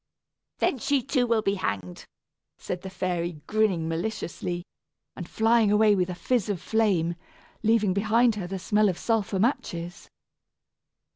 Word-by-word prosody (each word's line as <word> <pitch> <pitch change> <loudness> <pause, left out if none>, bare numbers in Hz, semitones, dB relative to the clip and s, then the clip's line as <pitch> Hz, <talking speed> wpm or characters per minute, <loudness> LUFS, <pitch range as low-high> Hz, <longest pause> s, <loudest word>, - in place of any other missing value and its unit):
"Then 265 - 0
she, 275 +2 +1
too, 255 -1 +1
will 230 -2 +2
be 195 - +1
hanged," 95 - -4 0.5
said 180 -1 -5
the 190 - -7
fairy, 175 -2 -2
grinning 205 -6 +1
maliciously, 175 0 -3 0.5
and 175 - -7
flying 225 -1 +3
away 210 0 +5
with 185 -2 +1
a 180 - -4
fizz 225 +2 0
of 200 -4 -1
flame, 190 -5 +1 0.5
leaving 220 -4 +3
behind 220 +4 +3
her 200 -4 -5
the 195 +2 -4
smell 210 +3 +2
of 180 - -2
sulphur 220 -4 0
matches. 175 -6 -2
200 Hz, 145 wpm, -26 LUFS, 175-220 Hz, 0.5 s, away